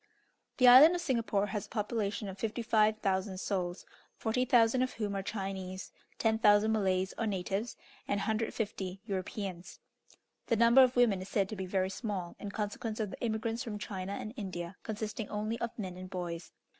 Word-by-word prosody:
The 255 - +6
Island 280 +8 +10
of 350 - -2
Singapore 230 -8 +1
has 205 0 -4
a - - -33
population 210 -1 -2
of 190 0 -7
55,000 215 -4 +1
souls, 180 -2 -2 0.3
40,000 240 +1 +3
of 255 - 0
whom 210 -3 -3
are 195 - -1
Chinese, 190 -2 -5 0.3
10,000 220 -1 +4
Malays, 190 -3 +1
or 225 - 0
natives, 195 +3 -2 0.3
and 205 - 0
150 210 -3 -2
Europeans. 190 -2 -5 0.7
The 230 - +3
number 235 +3 +7
of 255 -1 +4
women 230 -6 +4
is 190 - -8
said 195 -2 +1
to 215 - -4
be 190 -2 -4
very 190 0 0
small, 190 -5 -4
in 205 - -5
consequence 215 +2 -4
of 210 -3 -2
the - - -9
immigrants 225 0 -1
from 215 -3 -5
China 195 -2 -5
and 215 +2 -5
India 180 -4 -5
consisting 215 0 -4
only 215 +2 -2
of 235 - -3
men 190 -5 -5
and 185 0 -8
boys. 175 -2 -5
210 Hz, 170 wpm, -32 LUFS, 190-225 Hz, 0.7 s, Island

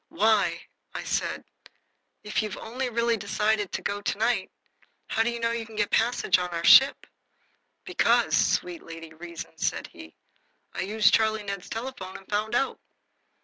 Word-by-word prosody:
"Why," 200 -6 +2 0.3
I - - -4
said, - - -2 0.8
"if 210 +1 -1
you've 215 -3 -5
only 250 +3 -4
really 235 0 +1
decided 210 0 0
to - - -4
go 205 0 -2
to 200 - -2
night, 225 -3 +1 0.6
how 225 - +1
do 225 - +2
you 235 0 -4
know 230 0 0
you 235 -1 -2
can 220 0 -13
get 210 -1 +2
a - - +7
passage 225 -5 +2
on 180 0 -2
our 170 -1 -4
ship?" 270 +10 +7 0.8
"Because, - - +2
sweet 355 -2 +1
Lady 165 -1 -10
Reason," 170 +1 -9
said - - -1
he, 80 0 -13 0.6
"I - - -3
used 210 +2 +3
Charlie 220 -1 +2
Ned's 200 -2 -6
telephone 225 -5 -6
and 195 - -17
found 215 +3 -1
out." 270 - 0
215 Hz, 170 wpm, -26 LUFS, 190-230 Hz, 0.8 s, a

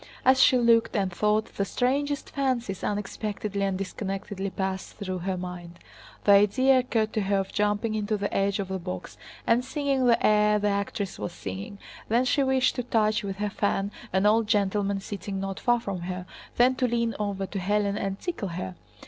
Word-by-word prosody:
As 260 +1 +6
she 260 - +6
looked 230 -1 +3
and 195 -4 0
thought, 210 +4 +1
the 200 - +2
strangest 280 +6 -1
fancies 250 -8 -1
unexpectedly 205 0 -3
and 195 -1 0
disconnectedly 195 0 -4
passed 190 0 -3
through 185 -3 -4
her 185 +1 -2
mind: 180 -1 -7 0.5
the 205 - +5
idea 255 +7 +5
occurred 225 -4 0
to 215 - 0
her 200 0 +1
of 195 0 -2
jumping 210 +1 0
onto 215 0 -1
the 200 0 -3
edge 195 0 +1
of 195 -2 -3
the 190 0 -2
box 180 +1 -6 0.3
and 235 +2 +3
singing 275 -2 0
the 235 - +5
aria 210 0 +4
the 205 0 +1
actress 200 0 -2
was 175 - -4
singing, 100 - -6 0.3
then 235 +3 +3
she 280 - +2
wished 265 -1 +3
to - - +1
touch 215 -3 +1
with 195 -1 -3
her 205 +1 -2
fan 200 0 0 0.2
an 190 +2 +2
old 220 +1 +4
gentleman 200 -1 +1
sitting 195 0 -5
not 195 0 -4
far 240 -1 +2
from 200 -5 -4
her, 180 +1 -5 0.3
then 250 +2 +5
to 255 0 0
lean 235 -1 0
over 200 -2 -2
to 195 - -5
Hélène 200 +1 0
and 195 0 -3
tickle 340 - -3
her. 165 - -5
205 Hz, 190 wpm, -27 LUFS, 195-230 Hz, 0.5 s, As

